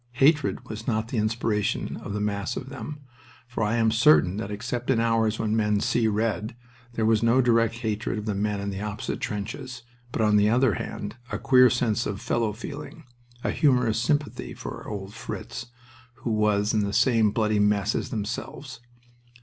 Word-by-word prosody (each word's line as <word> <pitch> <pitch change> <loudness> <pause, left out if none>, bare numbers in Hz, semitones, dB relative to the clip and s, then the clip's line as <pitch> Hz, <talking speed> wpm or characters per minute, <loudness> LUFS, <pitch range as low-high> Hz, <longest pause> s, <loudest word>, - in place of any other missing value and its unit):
Hatred 140 +3 +2
was 110 +1 -7
not 110 -2 0
the 120 - -1
inspiration 110 -1 -1
of 100 - -6
the 105 - -2
mass 105 +2 -2
of 130 - -6
them, 145 +2 -7 0.5
for 120 -2 -4
I 105 +1 +1
am 115 -1 +3
certain 110 -5 +5
that 105 -1 -4
except 120 +4 -4
in 130 -4 +3
hours 115 -1 +2
when 110 0 0
men 105 -2 +2
"see 115 +1 +1
red" 110 +1 -1 0.4
there 115 -2 0
was 110 -1 +3
no 115 +2 +4
direct 115 -2 +3
hatred 110 -2 -2
of 105 - -4
the 105 - -1
men 100 +1 -1
in 100 0 -3
the 95 0 -5
opposite 105 0 -4
trenches, 125 +5 -5 0.3
but, 115 - 0
on 105 -1 +4
the 105 +1 +4
other 120 0 +3
hand, 115 - -5
a - - -1
queer 125 -1 +6
sense 120 -2 0
of 100 -1 -4
fellow 115 -2 0
feeling, 145 +8 -8 0.4
a - - 0
humorous 125 -6 +2
sympathy 145 +4 -1
for - - -7
"old 100 -1 -6
Fritz," 120 - -6 0.5
who 125 -2 -4
was 105 0 +2
in 110 - +2
the 100 -1 -1
same 115 -2 +4
bloody 105 0 +1
mess 105 -1 +2
as - - -2
themselves. 120 +5 -5
110 Hz, 185 wpm, -26 LUFS, 105-120 Hz, 0.5 s, queer